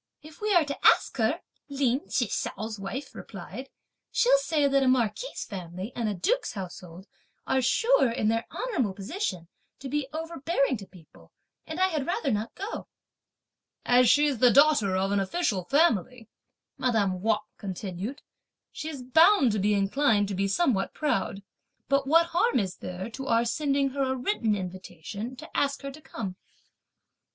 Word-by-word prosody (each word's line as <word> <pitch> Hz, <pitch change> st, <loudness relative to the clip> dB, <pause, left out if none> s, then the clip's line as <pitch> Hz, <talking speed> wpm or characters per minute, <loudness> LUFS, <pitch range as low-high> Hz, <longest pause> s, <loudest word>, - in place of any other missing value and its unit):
"If 310 Hz, +4 st, -14 dB
we 425 Hz, 0 st, 0 dB
are 340 Hz, -3 st, +5 dB
to 280 Hz, -, -6 dB
ask -, -, +4 dB
her," -, -, +1 dB, 0.3 s
Lin 275 Hz, -1 st, 0 dB
Chih 245 Hz, -, +1 dB
hsiao's 215 Hz, +1 st, -4 dB
wife 240 Hz, +9 st, -6 dB
replied, 210 Hz, +6 st, -9 dB, 0.4 s
"she'll -, -, +4 dB
say 310 Hz, -11 st, +1 dB
that 275 Hz, 0 st, +3 dB
a 265 Hz, -, +2 dB
marquis' 255 Hz, -, 0 dB
family 185 Hz, +1 st, -6 dB
and 230 Hz, -3 st, -1 dB
a 205 Hz, -, -2 dB
duke's 485 Hz, -, 0 dB
household 180 Hz, -2 st, -8 dB, 0.4 s
are 265 Hz, 0 st, +1 dB
sure, 450 Hz, -, +3 dB
in 230 Hz, -2 st, -1 dB
their 225 Hz, +1 st, 0 dB
honourable 255 Hz, -, -1 dB
position, 195 Hz, -, -4 dB, 0.3 s
to 270 Hz, -, -8 dB
be 295 Hz, 0 st, -1 dB
overbearing 320 Hz, -3 st, -1 dB
to 195 Hz, -2 st, -11 dB
people; 175 Hz, -5 st, -18 dB, 0.4 s
and 315 Hz, +2 st, -5 dB
I 375 Hz, 0 st, +4 dB
had 305 Hz, -6 st, -2 dB
rather 305 Hz, -5 st, 0 dB
not 215 Hz, +1 st, -2 dB
go." 400 Hz, +4 st, -6 dB, 1.0 s
"As 245 Hz, 0 st, +5 dB
she's 290 Hz, -4 st, +3 dB
the 250 Hz, -, +6 dB
daughter 270 Hz, -7 st, +4 dB
of 190 Hz, +1 st, 0 dB
an 200 Hz, -, +2 dB
official 195 Hz, -, -1 dB
family," 250 Hz, -, +1 dB, 0.5 s
madame 205 Hz, -7 st, +1 dB
Wang 220 Hz, +1 st, +3 dB, 0.2 s
continued, 195 Hz, +5 st, -5 dB, 0.5 s
"she's 305 Hz, -4 st, -6 dB
bound 320 Hz, -, +5 dB
to 210 Hz, -, -1 dB
be 205 Hz, +2 st, +2 dB
inclined 205 Hz, +1 st, +2 dB
to -, -, -3 dB
be 195 Hz, +1 st, 0 dB
somewhat 200 Hz, -, +1 dB
proud; 230 Hz, -9 st, -1 dB, 0.4 s
but 275 Hz, -1 st, +1 dB
what 330 Hz, +3 st, +5 dB
harm 450 Hz, +8 st, +3 dB
is 190 Hz, -5 st, -1 dB
there 180 Hz, +2 st, -6 dB
to 270 Hz, +3 st, -7 dB
our 230 Hz, -1 st, +3 dB
sending 275 Hz, +2 st, 0 dB
her 275 Hz, +1 st, -3 dB
a 260 Hz, -1 st, +1 dB
written 245 Hz, -, 0 dB
invitation 190 Hz, +4 st, -6 dB
to -, -, -12 dB
ask 280 Hz, 0 st, 0 dB
her 275 Hz, -, -4 dB
to 305 Hz, +3 st, -13 dB
come!" 195 Hz, -9 st, -6 dB
250 Hz, 165 wpm, -27 LUFS, 200-290 Hz, 1.0 s, the